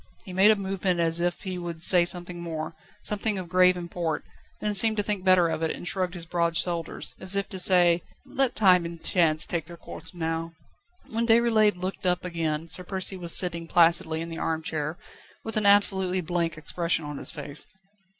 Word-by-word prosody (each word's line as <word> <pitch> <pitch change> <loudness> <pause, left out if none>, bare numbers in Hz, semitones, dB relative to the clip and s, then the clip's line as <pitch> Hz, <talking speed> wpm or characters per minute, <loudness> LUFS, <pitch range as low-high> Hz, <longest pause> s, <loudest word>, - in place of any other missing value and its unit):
He 185 - -9
made 190 +3 +5
a 220 - +6
movement 190 -2 -2
as 165 0 +1
if 175 0 -2
he 185 -2 -5
would 170 -2 -4
say 175 -1 +5
something 175 -1 -3
more, 160 -2 -5 0.3
something 210 0 -1
of 185 -2 -5
grave 180 +1 +4
import, 170 -2 -4 0.3
then 210 0 -2
seemed 220 +2 +5
to 205 - +1
think 205 -2 -1
better 185 -2 +4
of 160 - -3
it, 160 - 0
and 175 - -6
shrugged 185 -1 -1
his 170 -2 -6
broad 170 -1 0
shoulders, 170 -2 -2
as 190 +1 +2
if 200 0 -1
to 190 - -6
say: 175 -2 +4 0.2
"Let 270 -2 +1
time 185 -4 +4
and 170 0 -7
chance 165 -4 +2
take 170 -3 -3
their 170 +1 -11
course - - -9
now." 165 0 -3 0.5
When 230 +1 -1
Déroulède 225 -3 +3
looked 185 +1 -4
up 180 0 0
again 165 -2 -3
Sir 180 - -3
Percy 190 +1 -2
was 175 -2 +2
sitting 170 -2 +1
placidly 165 -1 +2
in 165 - -6
the 165 - -7
arm 160 0 -2
chair, 155 +1 -4 0.5
with 225 - -2
an 215 -1 +3
absolutely 190 -2 +3
blank 170 -1 -2
expression 165 0 -2
on 145 -1 -6
his - - -3
face. 145 0 -7
175 Hz, 200 wpm, -26 LUFS, 165-190 Hz, 0.5 s, a